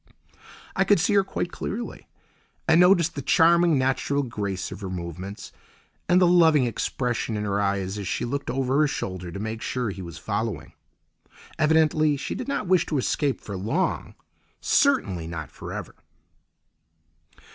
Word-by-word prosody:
I 190 - +3
could 200 -1 +4
see 200 +5 +2
her 200 -1 +5
quite 175 -2 -4
clearly, 235 +4 -6 0.6
and 160 +1 +5
noticed 175 -3 +4
the 140 - -5
charming, 170 +2 +4
natural 135 +2 0
grace 100 -7 -4
of - - -8
her 95 - -4
movements, 90 +3 -7 0.6
and 180 +1 +5
the 185 - +5
loving 165 -6 +5
expression 120 -1 -2
in 105 - -2
her 100 0 0
eyes 100 0 -1
as 100 - -5
she - - -1
looked 140 +4 -3
over 135 +1 0
her 155 - +4
shoulder 95 -8 -4
to 100 - -6
make 110 +1 -4
sure 125 -4 -2
he 95 0 -8
was 85 -2 -8
following. 105 -2 -3 0.9
Evidently, 155 -1 +3
she - - -4
did 250 - -5
not 280 -5 -2
wish 185 -1 +3
to 150 - -1
escape 135 +1 0
for 100 - -7
long, 115 - -2 0.4
certainly 100 - +2
not 80 -2 -6
for - - -9
ever. - - -6
130 Hz, 160 wpm, -25 LUFS, 100-165 Hz, 0.9 s, her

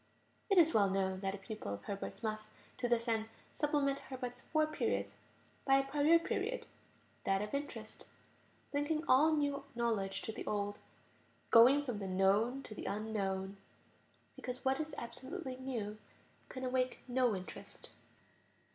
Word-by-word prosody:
It 395 - +4
is 330 -2 +7
well 200 -2 +5
known 190 -1 0
that 195 0 -2
a - - -7
pupil 195 - -5
of 100 - -13
Herbart's 200 +3 -5
must, 215 -1 -3 0.3
to 250 - +1
this 235 0 +2
end, 220 -1 0 0.2
supplement 285 -2 +1
Herbart's 250 -2 -6
four 310 -1 +2
periods 310 0 -1 0.5
by 270 - +5
a 275 - +3
prior 295 +4 +5
period, 410 +8 -2 0.6
that 195 +1 +2
of 210 - -6
interest; 285 +1 -5 0.7
linking 300 +2 0
all 305 +5 +6
new 285 -2 0
knowledge 220 -5 0
to - - -3
the - - -7
old, 205 0 -1 0.7
"going 260 +5 +8
from 245 -6 -3
the 195 - -4
known 200 +8 +2
to - - -8
the - - -7
unknown," 200 -2 -2 0.8
because 255 +1 -6
what 265 0 +2
is 310 -1 -3
absolutely 260 +4 -5
new 230 -5 -4 0.5
can 260 - -6
awake 255 0 0
no 250 -3 +2
interest. 185 -1 -9
245 Hz, 150 wpm, -35 LUFS, 205-280 Hz, 0.8 s, going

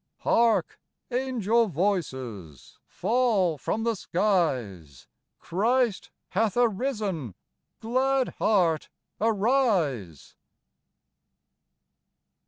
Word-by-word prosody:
Hark! 230 -1 +2 0.3
angel 235 -3 +1
voices 130 - -3
Fall 215 - +1
from 225 - -2
the 230 0 +1
skies; 130 - -1 0.3
Christ 230 +4 0 0.2
hath 215 +2 0
arisen! 215 - -1 0.5
Glad 260 +3 +1
heart, 175 -7 +2 0.3
arise 200 - 0
205 Hz, 65 wpm, -26 LUFS, 155-235 Hz, 0.5 s, Hark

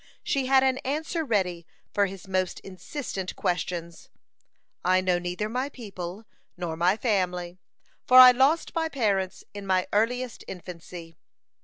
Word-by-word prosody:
She 270 -2 0
had 265 0 +5
an 260 0 +2
answer 315 +4 -2
ready 185 - 0 0.3
for 200 -1 +3
his 195 0 -10
most 185 -1 -1
insistent 195 0 -6
questions: 170 -1 -3 0.7
"I 185 +1 +4
know 185 -1 +1
neither 180 +4 -3
my 255 +5 -2
people 200 -5 -8 0.3
nor 175 -2 -3
my 180 +5 +2
family, 180 -6 -1 0.5
for 255 - +6
I 255 0 +12
lost 270 +6 +2
my 325 -1 0
parents 200 -9 -1
in 205 -1 -8
my 185 -1 +2
earliest 245 +4 0
infancy." 170 -2 -9
195 Hz, 140 wpm, -26 LUFS, 180-255 Hz, 0.7 s, I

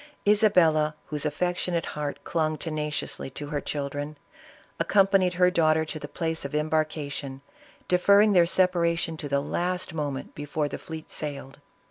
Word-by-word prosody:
Isabella, 175 -8 +4
whose 150 0 -2
affectionate 175 +2 -1
heart 150 -1 -5
clung 155 -2 0
tenaciously 150 -4 -3
to 145 -1 -5
her 145 -2 -2
children, 145 +1 -4 0.6
ac - - 0
companied 195 -2 +4
her 180 0 +4
daughter 160 -2 +3
to 155 0 -6
the - - -7
place 165 -1 -3
of 140 +1 -5
embarkation, 150 -3 -2 0.5
deferring 200 +3 +5
their 175 -2 +5
separation 170 -2 +1
to 145 - -6
the 140 0 +1
last 180 +3 -2
moment 145 -4 -4
before 145 +1 -2
the - - -6
fleet 160 -1 -8
sailed. 140 -3 -6
155 Hz, 145 wpm, -26 LUFS, 150-180 Hz, 0.6 s, deferring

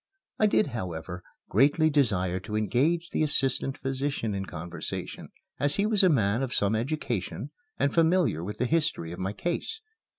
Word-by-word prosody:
I 215 - +5
did, 210 - +3
however, 90 -4 -5 0.3
greatly 145 - +3
desire 95 -11 +1
to 105 +3 -6
engage 145 +11 +1
the - - -1
assistant 135 -2 +1
physician 135 -4 -2
in 95 -1 -3
conversation, 85 +1 -6 0.3
as 145 0 +2
he 200 - +1
was 215 -2 +5
a 185 - +5
man 115 -5 +2
of 130 -2 -2
some 100 +1 +2
education 125 - -3 0.3
and 140 - +1
familiar 165 - +2
with 105 +4 -5
the - - 0
history 150 - 0
of 85 - -7
my 95 +2 -2
case. 175 - -3
130 Hz, 165 wpm, -27 LUFS, 100-155 Hz, 0.3 s, I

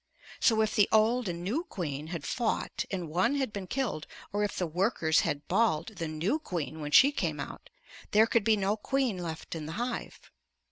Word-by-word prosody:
So 220 -3 +4
if 215 - -1
the 205 -2 +4
old 220 +1 +3
and 170 0 -4
new 245 - -1
queen 150 - -4
had 165 -3 -5
fought 235 -3 -1
and 180 -4 -3
one 180 - +1
had 265 -6 -1
been 195 -2 -5
killed, 230 - -2 0.3
or 205 0 +1
if 205 - -2
the 180 - 0
workers 170 -1 +2
had 145 0 -2
"balled" 195 -2 +1
the 165 - -2
new 165 - -1
queen 160 - -4
when 150 - -3
she 270 - +7
came 280 - -2
out, - - -7 0.4
there 215 +2 +5
could 230 -1 +2
be 220 0 +4
no 200 +1 +1
queen 250 -2 -1
left 165 -2 -5
in 155 -2 -5
the 160 - -5
hive. 240 +4 -5
200 Hz, 200 wpm, -30 LUFS, 165-230 Hz, 0.4 s, she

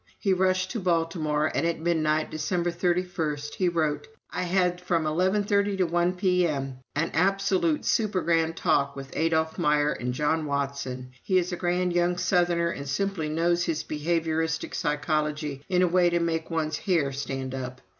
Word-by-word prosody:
He 195 -3 +1
rushed 185 0 +1
to 235 - -3
Baltimore, 165 -4 0
and - - 0
at 170 0 0
midnight, 155 -2 +1
December 175 +3 -1
31, 175 -3 -1 0.2
he 185 -2 +1
wrote: 155 -3 -1 0.2
"I - - -2
had 180 0 +1
from 170 -3 0
eleven 185 +6 +1
thirty 200 0 +1
to 190 - +3
one 175 +2 +1
P.M. 170 -8 0 0.2
an 165 +3 0
absolute 185 -2 +2
supergrand 170 -6 +1
talk 145 -5 +1
with 135 -1 -9
Adolph 160 0 0
Meyer 150 0 +3
and 125 +2 -3
John 150 +4 0
Watson. 140 -3 -3
He 185 - +1
is 180 +1 +1
a - - -1
grand 180 0 0
young 175 0 +2
southerner 175 -2 +2
and 140 -3 -6
simply 170 0 -1
knows 170 +2 +1
his 160 -2 -1
behavioristic 160 +1 -1
psychology 150 -1 -1
in 180 -1 +3
a - - +4
way 175 0 +4
to 170 0 +1
make 165 -1 -1
one's 160 -2 -1
hair 165 -9 +1
stand 135 -1 -4
up. 130 -1 -5
165 Hz, 165 wpm, -26 LUFS, 150-180 Hz, 0.2 s, a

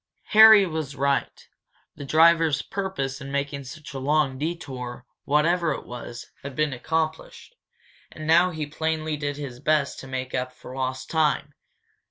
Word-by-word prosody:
Harry 220 -2 +9
was 155 -5 -4
right. 140 0 -1 0.5
The 145 - -8
driver's 160 -1 +4
purpose 165 -9 -4
in 140 0 -7
making 140 0 -3
such 145 +3 -10
a 135 - -4
long 140 -1 +1
detour, 135 -6 -5 0.2
whatever 165 +3 +2
it - - -7
was, 120 0 -9
had 140 -1 -8
been 150 -1 0
accomplished. 160 - -3 0.6
And 155 - -8
now 170 +3 +5
he 155 -3 -4
plainly 155 +1 -2
did 145 -1 -4
his 135 -4 -7
best 150 0 +1
to 135 - -9
make 130 -1 -5
up 125 0 -2
for 125 - -11
lost 130 0 -3
time. 155 -2 +1
145 Hz, 155 wpm, -25 LUFS, 135-160 Hz, 0.6 s, Harry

